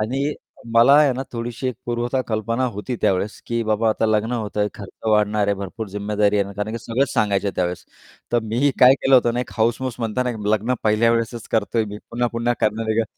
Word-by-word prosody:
आणि 135 +7 -1 0.4
मला 120 +4 +7
आहे 145 -3 +5
ना 130 +2 -3
थोडीशी 120 +2 -4
एक 125 - -3
पूर्वतः 120 +2 -1
कल्पना 115 +3 -1
होती 120 +4 -4
त्यावेळेस, 100 +3 0
की 115 0 -1
बाबा 110 +1 +1
आता 110 +1 +1
लग्न 110 +2 +1
होतंय, 105 -3 -1
खर्च 100 +2 -10
वाढणार 105 -1 +2
आहे, 100 - +2
भरपूर 100 +2 -6
जिम्मेदारी 105 +1 0
आहे, 100 0 -1
कारण 105 +2 -3
की 115 - -3
सगळंच 125 +4 -1
सांगायचं 100 -1 +1
त्यावेळेस. 90 -1 -2 0.5
तर 120 - +4
मी 120 +6 +1
काय 130 +1 +8
केलं 135 0 +2
होतं 120 -2 +4
ना, 125 - 0
एक - - -6
हाऊस-माऊस 120 +2 0
म्हणताना 125 +3 -1 0.2
लग्न 110 +4 +1
पहिल्यावेळेसच 115 +1 +1
करतोय, 110 +1 +1
मी 105 0 -7
पुन्हा-पुन्हा 120 0 0
करणार 110 +1 0
आहे 110 - 0
का? 115 - 0
115 Hz, 195 wpm, -21 LUFS, 105-120 Hz, 0.5 s, काय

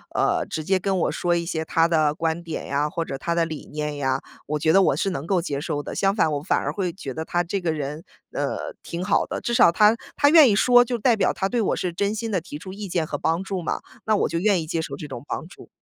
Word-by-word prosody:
呃， - - +1
直 155 - -4
接 190 +4 +2
跟 190 +1 0
我 - - +1
说 175 -1 0
一 170 - 0
些 160 -2 -2
他 165 +1 +3
的 155 -3 +2
观 165 +1 -2
点 165 -2 -5
呀， 145 +2 0
或 165 - -2
者 135 - -5
他 170 +5 -2
的 170 0 +2
理 160 -2 -7
念 150 -1 -3
呀， 135 -1 0 0.3
我 150 +1 -2
觉 160 +1 +3
得 195 +4 +6
我 - - +3
是 195 - 0
能 175 -6 -4
够 180 0 +1
接 145 -5 -3
受 145 0 -2
的。 - - -7
相 195 0 +2
反， 160 -7 +2
我 145 -1 -2
反 - - +1
而 - - -2
会 185 -4 -2
觉 160 -7 -7
得 160 +4 -5
他 175 +1 0
这 190 +3 -2
个 175 -3 -1
人， 150 +1 -4 0.3
呃， - - -3
挺 170 +1 -5
好 200 +2 +2
的， - - -5
至 240 - -1
少 235 - +6
他 210 +5 +5 0.2
他 285 - +4
愿 310 -3 +8
意 - - +3
说， 245 +3 +6
就 240 -1 -2
代 235 +2 +3
表 210 - +1
他 195 0 -1
对 245 - 0
我 215 - +1
是 180 - -2
真 200 +4 -1
心 225 +1 -3
地 195 -4 0
提 160 -3 -9
出 185 - -9
意 200 +1 -6
见 170 -3 -1
和 - - -3
帮 165 +3 0
助 190 -2 -4
嘛， - - -2 0.2
那 215 - +3
我 - - +1
就 165 - -2
愿 190 -1 +2
意 155 - -7
接 165 0 -1
受 140 - -5
这 150 - -8
种 135 -1 -8
帮 160 - -4
助。 - - -15
170 Hz, 310 characters per minute, -24 LUFS, 155-195 Hz, 0.3 s, 愿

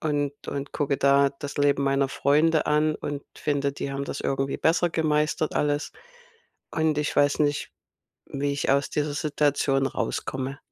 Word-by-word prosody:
und 145 -2 0 0.2
und 140 0 -4
gucke 140 -1 0
da 140 0 +4
das 140 0 -8
Leben 140 -1 +3
meiner 135 0 +2
Freunde 155 +4 +2
an 150 +1 +2
und 145 -1 -5
finde, 140 -1 -1
die 140 0 -5
haben 140 0 -3
das 140 - -5
irgendwie 135 0 -1
besser 170 +2 +2
gemeistert 155 -1 0
alles, 145 0 0 0.8
und 160 -2 +1
ich 150 - -1
weiß 145 +1 +3
nicht, 145 -1 0 0.5
wie 140 +1 -2
ich 140 - -1
aus 140 0 +2
dieser 150 -1 -1
Situation 145 -2 +1
rauskomme. 130 0 -3
145 Hz, 155 wpm, -25 LUFS, 140-150 Hz, 0.8 s, da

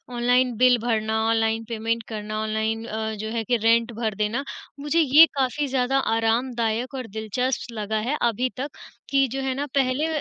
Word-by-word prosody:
online 245 +1 +2
bill 250 +1 +5
भरना, 220 -1 0
online 225 0 +1
payment 230 0 -2
करना, 215 -1 -4
online 220 +1 -2
अ, 220 -1 -3
जो 215 +1 -5
है 230 -1 -2
कि 240 +2 +1
रेंट 230 +1 +3
भर 220 -2 -2
देना, 210 +6 -1 0.4
मुझे 295 +3 0
ये 305 +1 +8
काफ़ी 275 +2 0
ज़्यादा 260 0 +1 0.2
आरामदायक 230 +1 0
और 255 -3 -5
दिलचस्प 240 +4 -2
लगा 215 +1 -2
है 300 - 0
अभी 240 +2 +1
तक 275 +3 -3 0.4
कि 275 -1 +3
जो 270 +1 -3
है 265 -1 -1
ना 285 +2 -2
पहले 270 +3 +1
235 Hz, 175 wpm, -24 LUFS, 220-260 Hz, 0.4 s, ये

